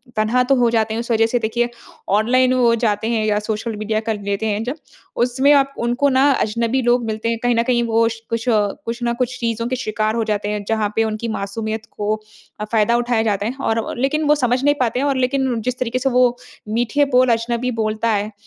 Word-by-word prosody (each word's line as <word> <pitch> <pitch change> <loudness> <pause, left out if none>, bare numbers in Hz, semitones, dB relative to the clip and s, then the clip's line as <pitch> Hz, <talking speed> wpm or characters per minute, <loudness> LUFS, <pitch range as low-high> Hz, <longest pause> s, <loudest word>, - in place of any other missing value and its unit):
तन्हा 220 +4 +2
तो 270 +2 +2
हो 245 -2 +3
जाते 220 -1 +1
हैं। 225 - -2
उस 235 - -5
वज़ह 225 0 +4
से 245 +2 0
देखिए, 235 +2 -1 0.4
ऑनलाइन 250 +6 +3
वो 245 -2 +3
जाते 220 -2 0
हैं 225 -2 0
या 210 -1 +1
सोशल 220 +2 -3
मीडिया 215 +1 -1
कर 215 -2 -1
लेते 200 +2 -2
हैं 210 0 -1
जब, 250 +5 -3 0.4
उसमें 255 +4 +2
आप 275 -1 +3
उनको 245 +4 +1
ना 270 +2 +4
अजनबी 230 +3 0
लोग 240 0 +2
मिलते 220 +1 -2
हैं। 230 - 0
कहीं 245 -1 +2
न 230 - +2
कहीं 240 -1 +1
वो 230 0 +3
स 225 0 -7
कुछ, 230 +1 -2
कुछ 230 +2 -1
ना 235 0 +1
कुछ 250 +1 -2
चीज़ों 230 -1 -2
के 255 - -1
शिकार 215 -3 -1
हो 230 - 0
जाते 210 -1 -2
हैं, 210 -1 -3
जहाँ 220 -2 0
पे 225 - +3
उनकी 220 +1 -3
मासूमियत 220 +2 -4
को 210 +1 0 0.5
अ, 210 - -3
फ़ायदा 220 +1 +2
उठाया 240 -1 +1
जाता 205 -2 0
है। 240 +4 -3
और 225 0 +1
और - - -6
लेकिन 275 +4 0
वो 300 - +5
समझ 250 -2 0
नहीं 290 +1 +3
पाते 250 -3 0
हैं 280 - 0
और 280 -1 +1
लेकिन 260 -1 0
जिस 250 +2 -2
तरीके 255 0 -1
से 270 +1 +1
वो 250 -1 +3 0.4
मीठे 240 +5 +2
बोल 255 0 +4
अजनबी 235 +2 -1
बोलता 220 0 -1
है, 210 0 -1
230 Hz, 235 wpm, -20 LUFS, 220-250 Hz, 0.5 s, वो